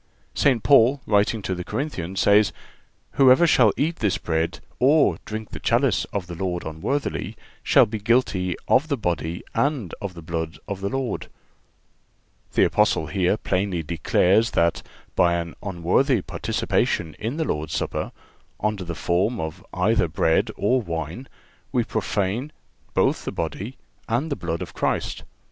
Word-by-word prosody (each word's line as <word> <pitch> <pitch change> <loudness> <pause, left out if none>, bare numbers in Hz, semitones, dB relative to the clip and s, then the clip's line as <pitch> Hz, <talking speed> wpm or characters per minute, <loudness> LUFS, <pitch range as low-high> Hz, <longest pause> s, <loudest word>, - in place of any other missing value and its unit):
St. 130 -6 +2
Paul, 135 0 +5
writing 105 +1 +2
to 95 - -1
the 90 -1 -4
Corinthians, 95 - -3
says: 100 0 +5 0.6
"Whosoever 135 +4 +6
shall 125 -9 +5
eat 165 +3 0
this 105 -4 +1
bread, 80 0 -1 0.2
or 145 +4 +4
drink 110 0 -6
the - - -6
chalice 120 -2 +2
of 100 -3 -4
the 90 - -8
Lord 90 0 -3
unworthily, 80 - -3 0.2
shall - - +5
be 110 +1 -5
guilty 100 -6 +1
of 145 - +4
the 140 -3 -1
body 85 -4 -2
and 140 - 0
of 100 -3 -5
the 85 - -10
blood 80 0 -4
of 100 -2 -5
the 100 - -1
Lord."(379) 135 -3 -9
The - - +5
Apostle 80 - +2
here 90 +5 +1
plainly 95 -4 -1
declares 90 +7 +2
that, 85 0 +2 0.3
by 85 -1 +4
an 85 -1 -3
unworthy 100 - +1
participation 80 -3 -1
in 115 +7 -3
the 160 - 0
Lord's 75 - -2
Supper, - - -2 0.5
under 105 -2 -1
the 85 -1 -5
form 100 +9 0
of 80 -1 -5
either 90 +1 +2
bread 80 +1 +1
or 125 +6 +2
wine, 85 - -5 0.4
we 125 -3 +2
profane 110 +5 -2 0.4
both - - +2
the - - -3
body 95 - -4 0.3
and 130 +8 0
the - - +1
blood 85 -8 -3
of - - -10
Christ. - - -1
100 Hz, 155 wpm, -24 LUFS, 85-125 Hz, 0.6 s, Whosoever